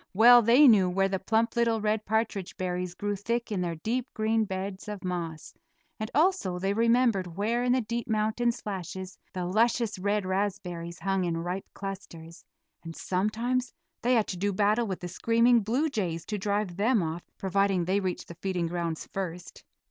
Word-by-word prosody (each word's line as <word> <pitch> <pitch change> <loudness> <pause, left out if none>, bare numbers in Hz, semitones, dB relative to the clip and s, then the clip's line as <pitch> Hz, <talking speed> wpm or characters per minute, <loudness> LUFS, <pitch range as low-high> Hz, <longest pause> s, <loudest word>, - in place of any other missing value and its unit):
Well 240 +3 +8
they 245 +6 +6
knew 200 -6 +6
where 195 +2 +2
the 190 -1 -1
plump 225 +5 +1
little 230 -1 +2
red 215 0 -1
partridge 215 -3 -1
berries 180 -1 -3
grew 205 +2 -2
thick 235 +4 -2
in 195 -3 -1
their 170 -2 -2
deep 235 - -3
green 220 0 +1
beds 190 0 -5
of 210 -2 -6
moss, 170 -3 -4 0.5
and 215 0 -3
also 315 - +2
they 195 +2 0
remembered 230 -6 +2
where 230 +4 0
in 250 - +2
the 255 - +2
deep 235 +2 -4
mountain 220 +2 +1
slashes 190 -4 -6
the 180 -1 -3
luscious 225 +2 +1
red 205 +1 0
raspberries 180 -3 -3
hung 195 -1 0
in 170 -2 -1
ripe 180 +3 -4
clusters; 175 -4 -8 0.4
and 165 -1 -8
sometimes 230 +7 -1 0.3
they 250 +1 +3
had 225 -3 +3
to 185 - -3
do 200 +3 0
battle 210 +4 +2
with 190 -2 -4
the 180 - -4
screaming 230 +6 +3
blue 240 +9 0
jays 180 - -3
to 210 -1 -3
drive 200 -2 -1
them 220 -1 +2
off, 165 +2 -3 0.2
providing 195 -2 +1
they 190 +3 +1
reached 185 -2 -3
the - - -8
feeding 185 -3 -1
grounds 170 -1 -3
first. 180 -2 -6
200 Hz, 180 wpm, -28 LUFS, 180-230 Hz, 0.5 s, Well